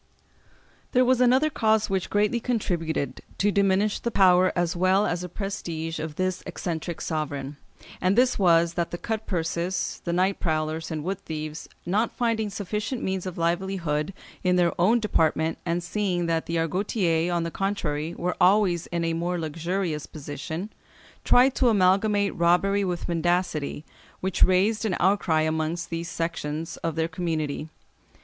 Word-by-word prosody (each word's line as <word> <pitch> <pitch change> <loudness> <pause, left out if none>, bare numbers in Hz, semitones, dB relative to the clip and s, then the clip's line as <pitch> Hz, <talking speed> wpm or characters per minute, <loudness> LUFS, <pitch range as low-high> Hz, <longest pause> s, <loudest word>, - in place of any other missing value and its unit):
] - - -33
There 255 -1 +5
was 255 0 +3
another 260 +5 +4
cause 220 -4 +2
which 190 -2 -1
greatly 210 +3 +2
contributed 165 - -2 0.2
to 205 +1 +2
diminish 200 +1 +2
the 235 - -2
power 185 -3 +5
as 175 0 0
well 185 +3 +3
as 175 0 -1
the 180 - -6
prestige 165 -5 -4
of 155 -1 -5
this 185 +1 -1
eccentric 170 -1 -4
sovereign, 145 -3 -3 0.4
and 185 +4 +2
this 250 -2 +3
was, 170 -2 +4
that 170 -1 -1
the 175 - -5
cut 220 +3 -4
purses, 170 +1 -2
the 170 - -2
night 185 +3 +1
prowlers 155 -1 -1
and 155 -2 -4
wood 190 +3 -2
thieves, 155 -2 -6 0.2
not 210 +6 +1
finding 225 -3 0
sufficient 210 +5 -3
means 190 -1 -2
of 180 - -6
livelihood 170 -2 -1 0.3
in 180 -1 +3
their 175 -1 +3
own 225 +7 +4
department, 160 -6 +1
and 170 +1 0
seeing 180 -2 -1
that 165 -1 -1
the 170 - -2
Argotiers, 175 0 0
on 170 -1 0
the 165 - -3
contrary, 170 -5 -2
were 180 +1 -2
always 185 -3 +4
in 170 -1 -2
a 165 - 0
more 175 +2 -1
luxurious 165 0 -2
position, 160 +6 -6 0.5
tried 255 +2 +5
to 255 -2 +3
amalgamate 200 0 +3
robbery 185 +4 +3
with 180 -2 -2
mendicity, 170 -3 0 0.4
which 190 -1 -3
raised 195 +5 +4
an 215 -4 0
outcry 180 -4 +2
amongst 160 +2 -1
these 165 0 -3
sections 165 -1 -3
of 165 -2 -3
their 160 0 +1
community. 160 -3 -3
175 Hz, 160 wpm, -26 LUFS, 165-200 Hz, 0.5 s, There